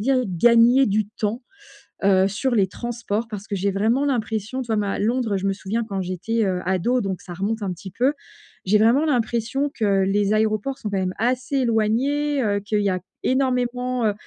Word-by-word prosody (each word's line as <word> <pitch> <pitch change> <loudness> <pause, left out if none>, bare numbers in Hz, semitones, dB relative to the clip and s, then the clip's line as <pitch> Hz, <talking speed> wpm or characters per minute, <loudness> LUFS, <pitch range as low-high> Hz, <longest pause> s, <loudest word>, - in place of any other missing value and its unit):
dire 260 +4 +2
gagner 235 +8 +5
du 210 0 +1
temps, 215 +3 -3 0.6
heu, 190 -1 +4
sur 240 +6 -1
les 195 -3 +3
transports, 235 +1 -4
parce 210 -1 -7
que 200 - -3
j'ai 195 +1 0
vraiment 225 +8 +1
l'impression, 235 -1 -2
tu 240 - -7
vois 225 - 0
ma 200 -1 -1
Londres, 230 -1 0
je 195 - -2
me 195 - +1
souviens 210 +4 -3
quand 195 -1 -3
j'étais, 190 +5 -2
heu, 185 -2 -1
ado, 190 +7 +1
donc 190 -2 -3
ça 180 - -9
remonte 210 +4 -2
un 190 - -2
petit 190 +2 -10
peu. 255 +9 +1 0.5
J'ai 210 +3 +4
vraiment 240 +8 +4
l'impression 250 +1 0
que 200 -6 +1
les 205 +1 +1
aéroports 215 +5 0
sont 210 - -4
quand 200 - -2
même 185 -1 -1
assez 250 +4 0
éloignés. 260 +5 +1
Heu, 205 -1 +1
qu'il 205 +1 -1
y 200 - +1
a 185 0 -1 0.2
énormément 250 -2 0
heu, 210 - +1
220 Hz, 200 wpm, -22 LUFS, 200-250 Hz, 0.6 s, gagner